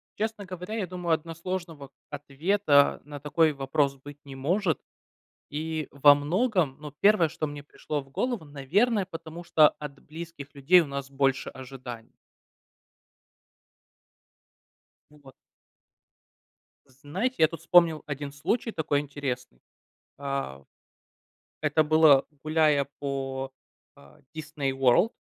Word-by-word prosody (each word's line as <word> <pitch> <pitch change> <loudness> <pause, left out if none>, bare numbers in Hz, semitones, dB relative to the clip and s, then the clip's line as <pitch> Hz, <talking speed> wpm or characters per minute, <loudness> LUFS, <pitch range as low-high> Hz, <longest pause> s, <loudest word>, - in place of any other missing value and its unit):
Честно 215 -1 -3
говоря, 185 +2 -7
я 205 -5 -2
думаю, 175 -1 -1
односложного 165 -2 -5 0.2
ответа 145 +2 +2
на 145 -1 -8
такой 155 +2 +2
вопрос 140 0 0
быть 145 +2 -11
не 135 -1 -9
может. 165 +5 0 0.7
И 155 0 -3
во 145 +1 +7
многом, 170 - 0
ну, 150 -1 -8
первое, 200 -6 +5
что 155 0 -3
мне 145 -1 -8
пришло 150 0 -5
в 135 - -18
голову, 240 - -2
наверное, 185 - +1
потому 165 -1 -9
что 155 -3 +5
от 145 -2 -8
близких 160 -3 -9
людей 160 +6 +5
у - - -2
нас 140 -1 -5
больше 135 -1 0
ожиданий. 125 -3 -9 3.0
Вот. 145 -3 -17 1.6
Знаете, 145 - -3
я 160 - +6
тут 165 -1 -8
вспомнил 170 -3 +4
один 145 -1 -5
случай 220 - -1
такой 150 -4 0
интересный. 135 - -5 0.6
А. 135 - -4 1.0
Это 155 - +3
было 155 -3 +6 0.2
гуляя 155 -2 +3
по, 135 -1 -3 0.4
э, 70 0 -19
Disney 150 -3 -3
World. 135 - +3
150 Hz, 115 wpm, -27 LUFS, 140-170 Hz, 3.0 s, во